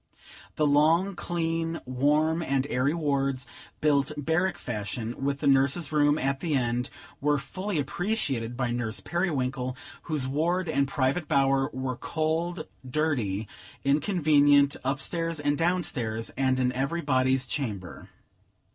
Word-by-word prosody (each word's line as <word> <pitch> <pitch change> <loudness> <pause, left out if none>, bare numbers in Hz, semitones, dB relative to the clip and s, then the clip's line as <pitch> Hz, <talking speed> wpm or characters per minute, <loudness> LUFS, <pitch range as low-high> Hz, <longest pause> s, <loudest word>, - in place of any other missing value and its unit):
The 150 - +2
long, 160 +7 +3
clean, 165 -1 -2
warm, 150 +6 +2
and 135 -4 0
airy 130 +3 +2
wards, 140 -4 0 0.4
built 145 -2 +3
barrack 160 +6 0
fashion, 115 +2 -4
with 140 0 -1
the 145 - +1
nurse's 140 +4 +3
room 145 -1 +3
at 135 -1 -1
the 160 -2 -1
end, 120 -1 0 0.3
were 145 +1 +2
fully 185 +6 -4
appreciated 140 - -2
by 125 -2 0
Nurse 115 -2 -1
Periwinkle, 130 -7 -1 0.3
whose 150 -5 0
ward 170 +6 0
and 140 -3 +1
private 140 +4 0
bower 135 -1 +2
were 130 -1 -3
cold, 160 +1 -2 0.2
dirty, 125 -8 -1 0.4
inconvenient, 145 -2 +4
up 135 +1 0
stairs 165 +2 -2
and 145 0 +1
down 175 +3 +1
stairs, 115 -5 -3
and 130 -1 +1
in 125 -1 +2
every 140 +7 -1
body's 130 -2 +2
chamber. 105 - -5
140 Hz, 135 wpm, -27 LUFS, 130-160 Hz, 0.4 s, inconvenient